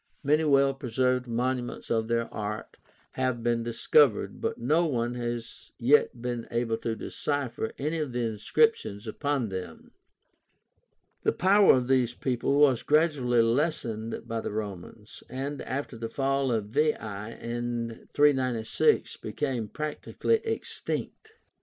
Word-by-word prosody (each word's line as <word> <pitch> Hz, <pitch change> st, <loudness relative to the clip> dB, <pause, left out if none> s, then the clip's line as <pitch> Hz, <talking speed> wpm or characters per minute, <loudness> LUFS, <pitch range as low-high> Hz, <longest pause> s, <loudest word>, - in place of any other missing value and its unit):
Many 150 Hz, +2 st, +3 dB
well 140 Hz, -2 st, +4 dB
preserved 125 Hz, -1 st, 0 dB
monuments 125 Hz, +1 st, -2 dB
of 110 Hz, -1 st, +1 dB
their 115 Hz, 0 st, 0 dB
art 105 Hz, 0 st, -5 dB, 0.3 s
have 130 Hz, -3 st, -1 dB
been 120 Hz, 0 st, +1 dB
discovered, 115 Hz, +2 st, +2 dB
but -, -, -1 dB
no 150 Hz, +8 st, +2 dB
one 120 Hz, -4 st, -1 dB
has 120 Hz, -1 st, -5 dB
yet 125 Hz, 0 st, +3 dB
been 120 Hz, -2 st, -3 dB
able 115 Hz, -1 st, 0 dB
to 115 Hz, 0 st, -3 dB
decipher 140 Hz, -3 st, -3 dB
any 155 Hz, +4 st, -2 dB
of 150 Hz, -4 st, -2 dB
the 120 Hz, 0 st, -2 dB
inscriptions 110 Hz, -, +1 dB
upon 135 Hz, +1 st, -1 dB
them. 90 Hz, -4 st, -7 dB, 1.3 s
The -, -, +2 dB
power 195 Hz, 0 st, +6 dB
of 125 Hz, -1 st, 0 dB
these 125 Hz, -2 st, +2 dB
people 130 Hz, +2 st, 0 dB
was 135 Hz, -5 st, +5 dB
gradually 145 Hz, -7 st, +3 dB
lessened 115 Hz, -3 st, -1 dB
by 115 Hz, 0 st, -2 dB
the -, -, -4 dB
Romans, 105 Hz, 0 st, -7 dB
and 140 Hz, +2 st, -4 dB
after 135 Hz, -1 st, -4 dB
the 115 Hz, 0 st, -4 dB
fall 135 Hz, +1 st, 0 dB
of 110 Hz, -3 st, -1 dB
Veii, 150 Hz, +6 st, +3 dB, 0.5 s
in 120 Hz, -1 st, -4 dB
396, 135 Hz, -, +2 dB
became 125 Hz, -6 st, -3 dB
practically 155 Hz, -, -1 dB
extinct. 445 Hz, 0 st, -4 dB
125 Hz, 130 wpm, -28 LUFS, 115-145 Hz, 1.3 s, power